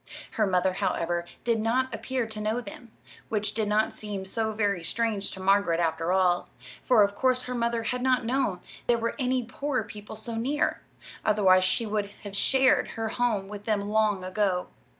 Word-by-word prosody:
Her 215 -2 +1
mother, 185 0 +2
however, 175 -1 -1 0.2
did 235 -2 +1
not 250 +4 +1
appear 255 +1 -2
to 220 -1 -6
know 215 +3 0
them, 235 +1 -10 0.4
which 210 -1 -1
did 215 -2 0
not 210 +1 +2
seem 205 -3 -5
so 220 +3 -1
very 205 -5 0
strange 215 +2 0
to - - -8
Margaret, 190 -3 +3
after 165 0 0
all; 180 -2 +2 0.3
for 240 -5 +5
of 200 0 +1
course 255 +3 +2
her 250 - -4
mother 235 -1 0
had 250 +2 -1
not 255 -2 +2
known 240 -6 0 0.3
there 240 - +4
were 230 0 -1
any 255 -1 +1
poor 270 +3 -2
people 210 0 -9
so 225 +2 -3
near, 265 +6 0 0.4
otherwise 190 -3 +4
she 205 +5 +1
would 205 -1 -2
have 200 -1 -7
shared 265 +5 +4
her 225 -1 -1
home 220 -5 0
with 205 0 -8
them 205 -2 -1
long 210 -3 +2
ago. 185 -1 0
215 Hz, 185 wpm, -27 LUFS, 195-235 Hz, 0.4 s, for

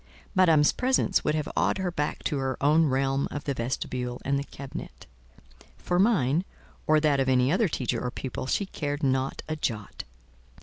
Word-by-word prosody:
Madame's 165 -6 +5
presence 255 -6 +1
would 150 - +1
have 155 -2 -1
awed - - +2
her 190 -2 -2
back 150 -3 -3
to 145 -4 -1
her 130 -1 -2
own 155 +3 +4
realm 135 +1 +1
of 145 - -5
the 140 - -1
vestibule 125 0 -3
and 140 +1 +1
the - - -3
cabinet—for 60 - -8
mine, 175 - +3 0.4
or 155 0 +5
that 150 -2 +2
of 135 0 +1
any 130 +1 +3
other 195 +5 +3
teacher 130 -6 -2
or 125 - -1
pupil, 130 +1 -5
she 200 - 0
cared 145 -4 -4
not 130 0 0
a 155 - -2
jot. 110 -9 -4
140 Hz, 175 wpm, -27 LUFS, 130-155 Hz, 0.4 s, Madame's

